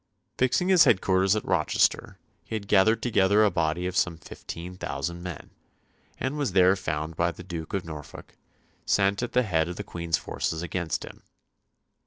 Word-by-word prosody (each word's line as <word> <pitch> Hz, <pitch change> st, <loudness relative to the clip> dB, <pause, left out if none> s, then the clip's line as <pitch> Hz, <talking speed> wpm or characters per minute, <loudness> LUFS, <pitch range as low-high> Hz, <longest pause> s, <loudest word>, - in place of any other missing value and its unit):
Fixing 130 Hz, +8 st, +2 dB
his 185 Hz, -3 st, +7 dB
headquarters 95 Hz, 0 st, +3 dB
at 110 Hz, -, -3 dB
Rochester, 90 Hz, -5 st, +1 dB, 0.3 s
he -, -, -6 dB
had 100 Hz, -2 st, -5 dB
gathered 105 Hz, +3 st, +4 dB
together 105 Hz, -3 st, +3 dB
a 105 Hz, -, +3 dB
body 85 Hz, +1 st, -1 dB
of 90 Hz, 0 st, -3 dB
some 90 Hz, -2 st, +1 dB
fifteen 85 Hz, +2 st, -9 dB
thousand 85 Hz, -1 st, -4 dB
men, 90 Hz, -4 st, -8 dB, 0.7 s
and 135 Hz, +3 st, -2 dB
was 135 Hz, -10 st, -1 dB
there 95 Hz, 0 st, +5 dB
found 80 Hz, -4 st, -4 dB
by 85 Hz, +2 st, +1 dB
the 85 Hz, -, -11 dB
Duke 85 Hz, 0 st, -6 dB
of 95 Hz, -, -3 dB
Norfolk, 75 Hz, -3 st, -10 dB, 0.5 s
sent 100 Hz, +1 st, +2 dB
at 120 Hz, -, -4 dB
the 125 Hz, -, +3 dB
head 85 Hz, -6 st, 0 dB
of 90 Hz, -, -5 dB
the 105 Hz, -, -5 dB
Queen's 85 Hz, -3 st, -2 dB
forces 80 Hz, +1 st, -3 dB
against 85 Hz, -2 st, -3 dB
him. -, -, -13 dB
90 Hz, 175 wpm, -26 LUFS, 85-105 Hz, 0.7 s, his